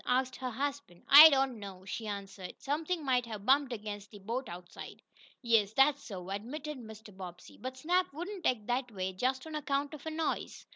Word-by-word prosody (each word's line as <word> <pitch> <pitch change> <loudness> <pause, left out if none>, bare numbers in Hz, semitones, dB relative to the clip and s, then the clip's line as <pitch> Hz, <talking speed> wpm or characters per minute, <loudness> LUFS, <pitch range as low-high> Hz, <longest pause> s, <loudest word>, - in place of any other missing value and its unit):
asked 255 +1 +1
her 255 -1 -3
husband. 275 -6 -4
"I 300 +3 +12
don't 270 -4 +1
know," 190 -2 -9
she 220 +3 -5
answered. 200 -2 -6
"Something 310 +3 -2
might 250 -2 +2
have 210 -3 -7
bumped 275 +1 +4
against 205 -3 -6
the 210 - -12
boat 230 +6 -4
outside." 175 0 -9 0.4
"Yes, 225 -3 +3
that's 275 +3 +4
so," 190 -4 -7
admitted 275 +8 -5
Mr. 220 -3 -11
Bobbsey. 180 -2 -10
"But 260 +1 -6
Snap 360 +5 +1
wouldn't 355 +6 -4
act 220 -5 0
that 245 +1 -1
way 190 -2 -3
just 260 +8 -1
on 315 - -8
account 285 -1 -1
of 305 - -9
a - - 0
noise." 315 0 -3
250 Hz, 190 wpm, -32 LUFS, 205-285 Hz, 0.4 s, I